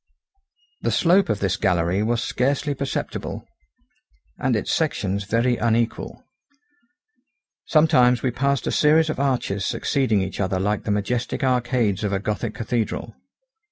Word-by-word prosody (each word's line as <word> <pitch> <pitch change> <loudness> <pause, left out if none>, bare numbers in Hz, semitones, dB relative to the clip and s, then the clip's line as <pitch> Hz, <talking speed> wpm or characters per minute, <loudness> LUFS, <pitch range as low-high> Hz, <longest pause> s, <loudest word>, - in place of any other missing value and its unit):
The - - 0
slope 185 +3 +3
of 105 -2 -1
this 95 - 0
gallery 90 -1 +1
was 115 +2 0
scarcely 140 +3 0
perceptible, 140 0 -4 0.9
and 130 -2 +1
its 105 - -1
sections 100 - -1
very 115 +4 +1
unequal. 115 0 -1 1.4
Sometimes 125 -6 +4
we 130 - +1
passed 140 +2 0
a - - -1
series 155 +1 +3
of - - -6
arches 125 -8 0
succeeding 130 -4 0
each 95 - -6
other 95 -1 0
like 105 +1 -1
the - - -3
majestic 115 +6 -2
arcades 120 -5 +1
of 100 -1 -1
a 95 - 0
gothic 105 +1 -3
cathedral. 115 -1 -3
120 Hz, 135 wpm, -23 LUFS, 100-135 Hz, 1.4 s, Sometimes